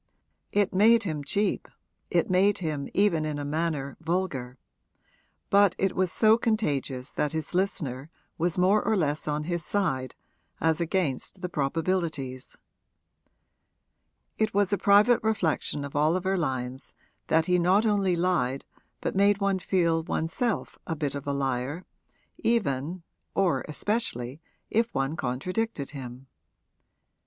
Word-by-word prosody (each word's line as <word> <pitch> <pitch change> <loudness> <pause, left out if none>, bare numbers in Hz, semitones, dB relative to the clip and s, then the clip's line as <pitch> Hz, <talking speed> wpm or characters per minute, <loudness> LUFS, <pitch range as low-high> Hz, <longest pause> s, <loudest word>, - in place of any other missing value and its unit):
It 205 -1 +1
made 225 +4 +5
him 155 -6 -3
cheap, 205 +8 0 0.4
it 175 -2 +2
made 190 +2 +3
him 155 -5 -3
even 190 -6 +2
in 155 -1 -2
a 145 - -4
manner 150 -2 -2
vulgar; 160 -7 -2 0.9
but 200 -2 +5
it 195 -1 0
was 185 -2 +1
so 220 +5 +4
contagious 145 - -1
that 150 0 -1
his 160 +1 -4
listener 150 -7 -1 0.3
was 170 +1 0
more 190 +4 +4
or 220 - +1
less 150 -3 -1
on 150 0 -1
his 170 +1 -2
side 145 -9 -1 0.4
as 160 +1 +2
against 170 0 -1
the 180 - -3
probabilities. 155 -3 -2 1.8
It 215 -2 0
was 205 -1 +3
a - - +3
private 210 +4 +5
reflection 170 -9 0
of 140 - -9
Oliver 175 +6 +2
Lyon's 130 -5 -3 0.3
that 160 0 +3
he 180 0 +2
not 185 +5 +3
only 200 -4 +2
lied 170 -7 0 0.4
but - - -2
made 200 +1 +4
one 200 -1 +1
feel 170 -3 +1
one's 160 0 -2
self 235 -4 -2
a 165 - -2
bit 145 -3 -2
of 140 0 -6
a - - +1
liar, 135 +4 -2 0.5
even 170 - 0 0.3
(or 195 -3 +2
especially) 150 - -2 0.3
if 230 +2 +2
one 135 +3 0
contradicted 155 - -2
him. 130 -2 -8
170 Hz, 135 wpm, -27 LUFS, 140-195 Hz, 1.8 s, made